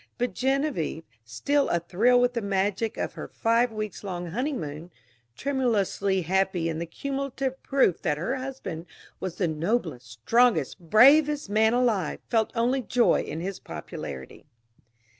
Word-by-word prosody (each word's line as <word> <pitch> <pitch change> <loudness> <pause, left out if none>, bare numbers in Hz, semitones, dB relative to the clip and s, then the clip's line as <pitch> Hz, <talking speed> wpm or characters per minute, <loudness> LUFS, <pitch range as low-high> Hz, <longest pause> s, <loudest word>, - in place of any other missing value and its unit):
But 245 0 -1
Genevieve, 265 - -1 0.2
still 275 - 0
a 170 - +2
thrill 215 +9 +3
with 245 0 +2
the 235 - -2
magic 200 +2 -1
of - - -3
her - - -7
five 230 +1 +1
weeks 215 -2 -5
long 175 -3 -5
honeymoon, 175 - -4 0.5
tremulously 210 -8 0
happy 185 -1 +1
in 160 -1 -3
the 170 - -4
cumulative 270 - -4
proof 265 -11 +2
that 150 -3 0
her 235 - -2
husband 255 -11 -6 0.3
was 185 -2 -4
the 180 - 0
noblest, 160 - -2
strongest, 165 - +2
bravest 275 - +5
man 220 +2 +3
alive, 225 -10 +1
felt 225 -2 +2
only 245 +3 +1
joy 240 +1 +2
in 160 - -5
his 190 +2 -4
popularity. 75 - -8
210 Hz, 140 wpm, -26 LUFS, 170-250 Hz, 0.5 s, bravest